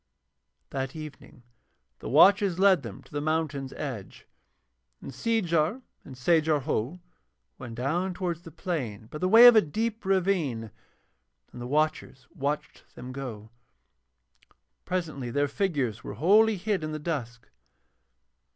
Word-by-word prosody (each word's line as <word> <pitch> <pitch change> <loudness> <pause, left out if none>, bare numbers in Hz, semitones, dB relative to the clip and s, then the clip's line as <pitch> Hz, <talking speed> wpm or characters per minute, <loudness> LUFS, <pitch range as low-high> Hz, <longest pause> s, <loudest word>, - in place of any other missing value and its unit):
That 135 0 -4
evening 150 -4 -10 0.6
the - - -7
watchers 200 -2 +5
led 190 -4 +5
them 115 -6 -9
to - - -22
the 145 -1 -3
mountain's 155 -3 -2
edge, 120 -10 -7 0.7
and 135 - -9
Seejar 205 -1 0 0.2
and 135 - -11
Sajar 155 +2 +2
Ho 145 +4 -2 0.6
went 120 -4 -8
down 170 +9 -1
towards 175 -3 -3
the 170 - -11
plain 150 - -4
by 150 - -6
the 185 - +1
way 225 +4 +9
of 240 -1 +10
a 220 - +7
deep 220 +7 -3
ravine, 175 - 0 0.8
and 120 - -9
the 120 - -5
watchers 150 -2 -1
watched 150 -2 -4
them 125 +1 -8
go. 115 -5 -7 1.3
Presently 155 -9 -3
their 145 +4 +1
figures 140 - -2
were - - -7
wholly 210 - +4
hid 195 -2 -1
in 155 0 -4
the - - -3
dusk. 135 -7 -5
155 Hz, 135 wpm, -27 LUFS, 130-185 Hz, 1.3 s, of